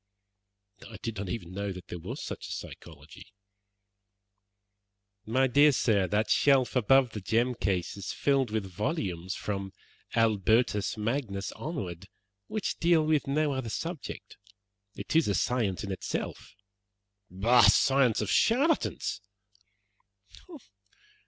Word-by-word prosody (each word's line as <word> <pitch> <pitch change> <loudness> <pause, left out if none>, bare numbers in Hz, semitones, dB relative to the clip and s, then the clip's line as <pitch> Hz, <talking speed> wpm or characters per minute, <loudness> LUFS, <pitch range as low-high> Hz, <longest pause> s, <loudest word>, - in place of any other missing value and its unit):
"I 110 - -9
did 115 -2 -4
not 95 -1 -4
even 90 -3 -5
know 100 +1 -3
that 90 -1 -10
there 90 - -6
was - - -6
such - - -6
a - - -8
psychology." 75 +1 -10 2.0
"My 130 +4 +2
dear 145 +4 +5
sir, 105 -7 +2
that 105 +3 0
shelf 135 -3 +3
above 125 +1 +4
the 105 - -6
gem 120 +6 +1
case 95 -6 -2
is 100 -1 -5
filled 135 -3 +1
with 110 -2 -2
volumes, 95 - -3
from 95 -2 -4 0.4
Albertus 110 0 +2
Magnus 105 -3 -2
onward, 100 - -6 0.4
which 215 -2 -3
deal 165 -2 +3
with 155 -2 +1
no 150 +2 +1
other 130 -4 -3
subject. 165 +6 -6 0.6
It - - -5
is 165 - +4
a 100 - +1
science 110 -7 0
in 100 - -4
itself." 95 - -5 0.9
"A 120 -2 +7
science 130 0 +3
of - - -2
charlatans!" 280 +8 +1
115 Hz, 125 wpm, -29 LUFS, 100-135 Hz, 2.0 s, A